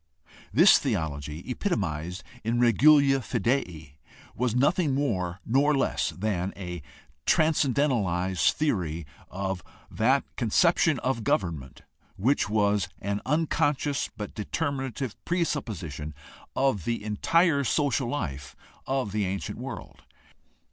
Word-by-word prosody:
This 165 - +7
theology 80 - -3
epitomized 90 - -2 0.2
in 115 +2 0
regulafidei 120 - +3 0.4
was 125 -1 -1
nothing 145 +2 +2
more 95 -11 -1
nor 140 +4 +3
less 135 - 0
than 95 -1 -2
a 90 -3 -6 0.5
transcendentalized 120 - +2
theory 90 - -1 0.2
of 95 -1 -3 0.3
that 130 +5 +2
con 120 -4 -1
ception 165 - +3
of 120 -2 -2
government 80 -10 -2 0.3
which 120 +1 +1
was 105 -3 +1
an 100 +1 -2
unconscious 145 -2 0
but 105 -2 -6
deter 145 +8 -2
minative 135 -3 -4
presupposition 95 - -3 0.4
of 130 -9 +1
the 115 -2 -2
entire 140 - +2
social 135 0 +1
life 70 - -4 0.3
of 130 -6 -1
the 105 0 0
ancient 95 +1 -4
world. - - -8
115 Hz, 105 wpm, -27 LUFS, 90-140 Hz, 0.5 s, This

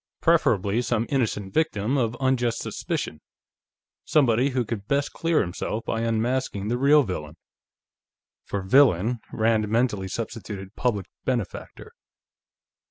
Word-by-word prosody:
Preferably 100 +4 +2
some 120 -2 0
innocent 110 -8 -1
victim 135 -6 +1
of 120 -3 0
unjust 125 -3 +1
suspicion; 75 - -4 0.8
somebody 130 -2 +3
who 125 -2 -1
could 105 -3 -5
best 140 +1 0
clear 165 -1 +1
himself 100 +5 -3
by 115 - -1
unmasking 115 -2 -1
the 120 - 0
real 145 +2 +6
villain.... 80 - -5 1.1
For 100 -1 -4
"villain," 120 0 +4
Rand 110 -1 +1
mentally 110 -4 +1
substituted 105 -2 -6
"public 105 -7 0 0.2
benefactor." 120 -6 -4
115 Hz, 115 wpm, -25 LUFS, 100-130 Hz, 1.1 s, real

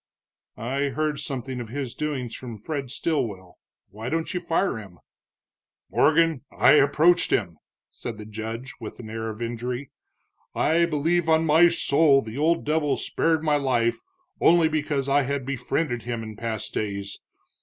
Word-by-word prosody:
"I 135 +6 -1
heard 150 +1 -1
something 130 -2 -4
of 115 - -8
his 130 -1 -4
doings 135 -6 -3
from 120 -4 -7
Fred 135 +4 -4
Stilwell. 110 - -3 0.3
Why 110 +4 -6
don't 165 +3 -2
you 180 - -1
fire 170 - 0
him?" 95 -5 -12 0.9
"Morgan, 160 -2 +3
I - - +5
approached 155 +5 +4
him," 85 -7 0 0.3
said 115 -3 -7
the 105 - -8
judge, 115 +3 -6
with 110 -3 -8
an 110 -3 -8
air 110 0 -3
of 110 +2 -5
injury. 120 +3 -4 0.6
"I 170 +2 +3
believe 165 +2 +1
on 160 0 +4
my 160 +3 +6
soul 145 -4 +3
the 110 +5 -6
old 165 +2 +2
devil 150 -1 +1
spared 160 -1 0
my 150 -2 +3
life 120 -4 +1 0.4
only 170 -1 +5
because 150 -3 -1
I 140 +1 +4
had 140 -1 -2
befriended 130 0 -1
him 115 -1 -4
in 110 -1 -8
past 110 -1 -4
days. 100 -1 -4
135 Hz, 155 wpm, -25 LUFS, 115-155 Hz, 0.9 s, my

